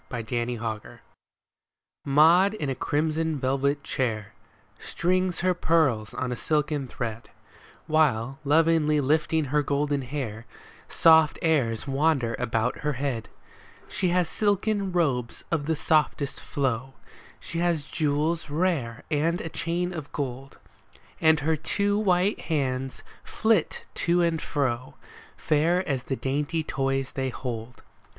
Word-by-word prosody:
MAUD 115 -2 -5
AND 120 0 -1
MADGE 110 -2 -5 1.1
Maud 165 +8 +5
in 145 -9 -2
a - - 0
crimson 155 +3 -1
velvet 140 +2 0
chair 110 -7 -2 0.5
Strings 185 +1 0
her 185 +1 +3
pearls 155 -11 +1
on 130 -1 -2
a - - -1
silken 150 0 -1
thread, 115 -2 -5 0.6
While, 135 -5 +1
lovingly 155 0 +3
lifting 155 +2 +1
her 150 - +4
golden 145 0 0
hair, 125 -5 -5 0.4
Soft 160 -1 +5
airs 135 -9 +1
wander 135 -4 +1
about 115 0 -1
her 150 0 -1
head. 130 -4 -3 0.6
She 190 0 -1
has 180 -1 +2
silken 205 +2 0
robes 135 -9 0
of 155 -3 -1
the 160 - +1
softest 150 -2 +1
flow, 130 -1 -2 0.4
She 165 - -5
has 170 -4 +1
jewels 155 +1 -1
rare 145 -8 -1
and 165 +4 +1
a 165 - -5
chain 175 +3 -2
of 155 -4 -7
gold, 135 -1 -5 0.6
And 160 -1 +4
her 160 +2 +1
two 205 +6 0
white 190 0 +2
hands 135 -4 -2 0.2
flit 220 -6 0 0.2
to 175 +1 +4
and 165 -2 0
fro. 130 -3 -2 0.4
Fair 170 +5 +1
as 135 -4 -1
the 135 - -2
dainty 145 +5 -1
toys 135 -2 -1
they 130 -1 -1
hold. 120 -2 -6
150 Hz, 130 wpm, -26 LUFS, 130-165 Hz, 1.1 s, Maud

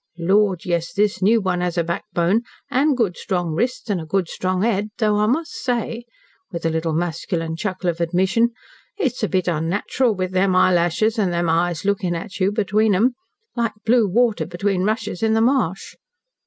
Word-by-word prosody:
Lord, 190 +1 +2
yes! 170 -2 -1
this 205 0 +1
new 220 +5 +4
one 180 -2 -1
has 180 0 -2
a 170 - +2
backbone 175 +4 0 0.3
and 275 +1 +2
good 210 -8 +1
strong 175 -3 -2
wrists 245 +10 -1
and 200 -5 -1
a - - -7
good 185 +1 0
strong 185 +2 -2
head, 210 -2 0
though 215 -3 +2
I 210 0 +2
must 310 +8 0
say" 240 -1 -3 0.5
with 170 -2 -5
a 165 - +2
little 160 0 -1
masculine 165 0 -2
chuckle 185 +1 -3
of 170 0 -1
admission 190 +7 +2 0.5
"it's 270 - -1
a 215 - +1
bit 185 +2 0
unnatural 180 +8 0
with 185 -1 -2
them 185 0 +2
eyelashes 185 +5 +2
and 195 -4 +1
them 170 -1 0
eyes 170 +1 0
looking 195 -3 0
at 180 +4 -7
you 190 +1 +2
between 210 0 +2
'em. 235 +7 +3 0.4
Like 235 -2 0
blue 230 -1 +4
water 230 +3 +1
between 185 +2 -1
rushes 215 -3 -2
in 220 0 +2
the 225 - +3
marsh." 230 -7 0
190 Hz, 185 wpm, -21 LUFS, 175-220 Hz, 0.5 s, new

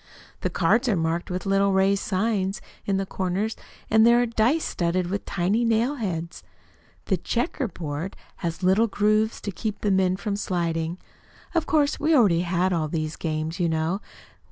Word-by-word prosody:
The - - -1
cards 245 +1 +2
are 210 - +3
marked 165 +1 -1
with 180 +1 -3
little 195 0 +2
raised 195 +1 +3
signs 195 -1 0 0.3
in 195 -1 +2
the 195 - -1
corners, 190 +4 -2 0.3
and 220 0 +5
there 235 +1 +6
are 245 - +3
dice 235 +7 +1
studded 175 +1 -1
with 200 - -3
tiny 200 +6 0
nailheads. 220 - -1 0.6
The 190 - +1
checker 245 - -1
board 165 0 -5 0.2
has 170 0 -4
little 195 +5 +4
grooves 215 +1 +1
to 205 - -4
keep 210 +3 -4
the 205 - +1
men 190 -1 +2
from 200 0 -2
sliding. 170 -3 -1 0.6
Of 335 -2 0
course, 295 -2 +2
we 315 +2 +3
already 195 - +4
had 180 +1 +1
all 160 -3 0
these 155 0 -3
games, 155 +1 -3
you 170 -2 +2
know. 160 +5 -1
195 Hz, 170 wpm, -25 LUFS, 175-220 Hz, 0.6 s, there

